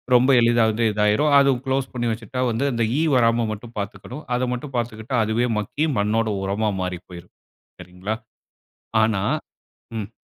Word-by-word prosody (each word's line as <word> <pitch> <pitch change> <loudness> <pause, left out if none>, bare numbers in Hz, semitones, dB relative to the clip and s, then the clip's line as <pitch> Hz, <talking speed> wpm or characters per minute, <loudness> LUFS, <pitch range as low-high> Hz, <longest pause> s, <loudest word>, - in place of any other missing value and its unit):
ரொம்ப 125 +2 +5
எளிதா 120 0 +4
வந்து 110 +2 -1
இதாயிரும். 105 +8 +2
அது 140 0 +4 0.2
குளோஸ் 135 0 -1
பண்ணி 120 -1 -1
வச்சுட்டா 115 +3 -4
வந்து, 115 +5 -1
அந்த 115 -1 0 0.2
ஈ - - +2
வராம 115 -1 +3
மட்டும் 115 +2 -8
பாத்துக்கணும். 120 +8 -6
அத 125 - 0
மட்டும் 135 +3 -6
பாத்துக்கிட்டா 115 +1 -3
அதுவே 115 +3 +1
மக்கி 145 +9 -1
மண்ணோட 110 +2 +1
உரமா 105 +2 0
மாறி 90 -1 -3
போயிரும். 90 0 -11 0.5
சரிங்களா. 90 +4 -5 0.9
ஆனா 110 -3 +1 0.8
ம். 105 -1 -5
115 Hz, 150 wpm, -23 LUFS, 105-125 Hz, 0.9 s, ரொம்ப